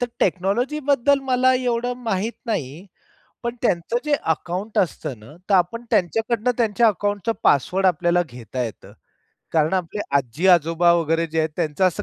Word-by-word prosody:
तर 245 - +1
टेक्नॉलॉजी 200 - 0
बद्दल 280 0 +3
मला 255 0 +4
एवढं 245 -1 -1
माहित 220 +1 -1
नाही. 170 - -4 0.6
पण 235 0 -3
त्यांचं 185 0 0
जे 300 -1 +2
अकाउंट 180 +6 -2
असतं 145 - -1
ना, 110 +8 -15
तर - - +5
आपण 190 +6 +1
त्यांच्याकडनं 225 +6 +1
त्यांच्या 230 0 +3
अकाउंटचं 205 +1 -1
पासवर्ड 180 +8 +2
आपल्याला 175 0 +2
घेता 125 +1 -5
येतं. 115 -3 -7 0.6
कारण 160 +2 +2
आपले 185 +2 -2 0.2
आजी-आजोबा 165 +5 +3
वगैरे 165 0 +1
जे 160 0 -4
आहेत, 160 0 +1
त्यांचं 155 +4 0
असं 185 +3 -1
185 Hz, 150 wpm, -22 LUFS, 165-230 Hz, 0.6 s, तर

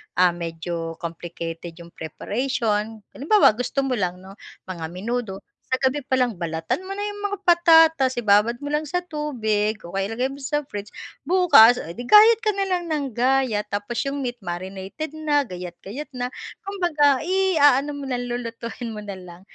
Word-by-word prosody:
ah, 180 -1 +5
medyo 165 -1 -5
complicated 170 0 -6
yung 170 0 -12
preparation, 215 - -2
halimbawa 360 - +5
gusto 255 +3 -1
mo 260 -2 0
lang 180 -1 -1
'no 190 - -11 0.4
mga 170 -3 -5
menudo, 210 +1 -4 0.3
sa 260 - +2
gabi 265 +2 +1
pa 260 0 -1
lang 245 -3 +1
balatan 165 - -2
mo 390 - -5
na 410 - -3
yung 410 0 -5
mga 405 - -3
patatas, 325 -6 +5
ibabad 215 +1 +3
mo 290 - -4
lang 300 0 0
sa 355 0 -1
tubig 220 -10 -1
o 170 - -9
kaya 195 0 -1
ilagay 245 +3 -1
mo 280 - -10
sa 295 +2 -1
fridge, 205 0 -5 0.4
bukas 335 -11 +7
oh 165 - -8
'di 205 - -12
gayat 440 +2 +8
ka 430 - +2
na 395 - 0
lang 365 -2 -1
nang 285 -4 -2
gayat 245 -4 +1
tapos 205 +4 -3
yung 280 0 -3
meat 245 -1 -4
marinated 190 - -6
na 300 -2 +1
gayat-gayat 185 - -8
na, 250 0 -3 0.3
kumbaga 310 -9 +2
i-aano 295 -7 +3
mo 285 -1 -6
lang 245 -1 -2
lulutuin 235 0 -5
mo 210 - -7
na 200 -2 -6
lang. 175 0 -12
245 Hz, 175 wpm, -23 LUFS, 195-295 Hz, 0.4 s, gayat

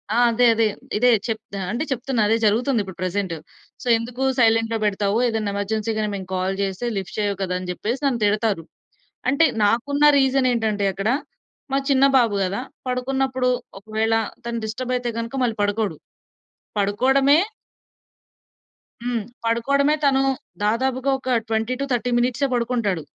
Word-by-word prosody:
ఆ! - - +2
అదే 245 +2 +3
అదే. 225 0 +2 0.3
ఇదే 250 +3 +4 0.2
చెప్ 220 -1 -2 0.2
ఆహ్, 190 - -3
అంటే 240 +7 -1
చెప్తున్నా 255 -1 -1
అదే 225 +2 +3
జరుగుతుందిప్పుడు 215 -3 +1
ప్రెజెంటు. 185 -2 -2 0.4
సో, - - -8
ఎందుకు 235 +3 -6 0.2
సైలెంట్‌లో 225 -1 +3
పెడతావు? 205 0 +1
ఏదన్నా 220 -3 -1
ఎమర్జెన్సీ‌గాని 215 +1 -1
మేము 190 -2 -6
కాల్ 185 +1 -1
చేస్తే 195 +4 -3
లిఫ్ట్ 190 +1 -5
చేయవు 205 -1 0
కదా! 185 -1 -1
అని 185 0 -7
చెప్పేసి 230 +9 -3
నన్ను 250 -5 0
తిడతారు. 205 -3 +1 0.7
అంటే 280 +5 +4 0.2
నాకున్న 255 +7 +1
రీజనేంటంటే 245 -6 +2
అక్కడ 200 +3 -1 0.6
మా - - +3
చిన్న 275 0 +5
బాబు 230 -5 +3
గదా! 195 +4 -2 0.3
పడుకున్నప్పుడు 255 0 0 0.3
ఒకవేళ 220 +2 -1 0.3
తను 235 0 -2
డిస్టర్బ్ 250 +4 -3
అయితే 245 -1 -3
గనక 230 +3 -5
మళ్ళి 230 -3 0
పడుకోడు. 205 0 0 0.8
పడుకోడమే 265 +8 +3 1.6
హ్మ్. 240 -2 -1 0.2
పడుకోవడమే 280 +6 +2
తను 270 -1 +4 0.4
దాదాపుగా 260 +5 +1
ఒక 260 -1 0
20-30 245 +3 -1
మినిట్సే 250 +3 +1
పడుకుంటాడు 235 -8 0
230 Hz, 135 wpm, -22 LUFS, 205-255 Hz, 1.6 s, చిన్న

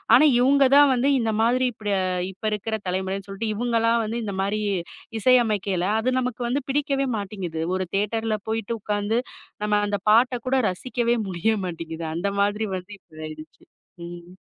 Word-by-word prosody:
ஆனா 305 - +6
இவுங்க 275 +2 +5
தான் 285 -1 +7
வந்து 255 +3 +2
இந்த 225 -2 0
மாதிரி, 250 +2 +3
இப்படி 215 -2 -4 0.4
இப்ப 195 - -22
இருக்கிற 210 +1 -2
தலைமுறைனு 190 +2 -2
சொல்ட்டு, 215 +3 -3
இவுங்களா 230 0 +1
வந்து 225 +2 -3
இந்த 200 -2 -4
மாரி 205 +2 -1 0.6
இசையமைக்கையில. 210 -7 +3 0.2
அது 250 +3 0
நமக்கு 250 -1 -3
வந்து 265 +4 0
பிடிக்கவே 275 -1 0
மாட்டேங்குது. 190 -5 -5 0.2
ஒரு 185 - -1
தியேட்டர்ல 215 +2 0
போயிட்டு 225 0 -2
உக்காந்து, 210 +2 0 0.4
நம்ம 210 0 +2
அந்தப் 205 0 -3
பாட்டக் 245 +2 +3
கூட 260 - +2
ரசிக்கவே 240 +5 -1
முடிய 185 +4 0
மாட்டேங்குது. 165 -1 -5
அந்த 175 +4 -1
மாதிரி 210 +2 +1
வந்து 185 +3 -10
இப்ப 155 0 -14
ஆயிடுச்சு. 155 0 -11 0.4
ம். 175 +1 -10
215 Hz, 155 wpm, -24 LUFS, 190-240 Hz, 0.6 s, தான்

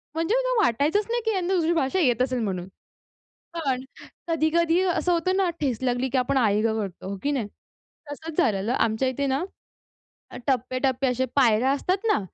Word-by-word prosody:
म्हणजे 330 +8 +1
मला - - +1
वाटायचंच 305 - +2
नाही, 475 0 0
की 445 - +2
यांना 375 -1 -1
दुसरी 340 -2 +2
भाषा 325 +3 0
येत 250 -6 +2
असेल 255 -1 0
म्हणून. 185 -4 -3 0.9
पण 270 -6 -2 0.4
कधी-कधी 330 +1 +2
असं 360 -1 +1
होतं 350 +2 +1
ना 380 -3 +2
ठेस 260 -7 -1
लागली, 250 +1 0
की 260 - 0
आपण 255 +2 +1
आई 210 -4 +3
गं 220 0 0
करतो. 195 -3 -6
हो 200 - -4
की 290 - +1
नाही? 250 -7 -1 0.6
तसंच 315 +2 -8
झालेलं 220 - +1
आमच्या 230 +2 +1
इथे 260 +2 -1
ना, 270 +5 0 1.0
टप्पे-टप्पे 255 +1 0
असे, 255 +1 0
पायऱ्या 250 -1 +4
असतात 365 +9 -1
ना. - - +2
270 Hz, 175 wpm, -25 LUFS, 245-335 Hz, 1.0 s, पायऱ्या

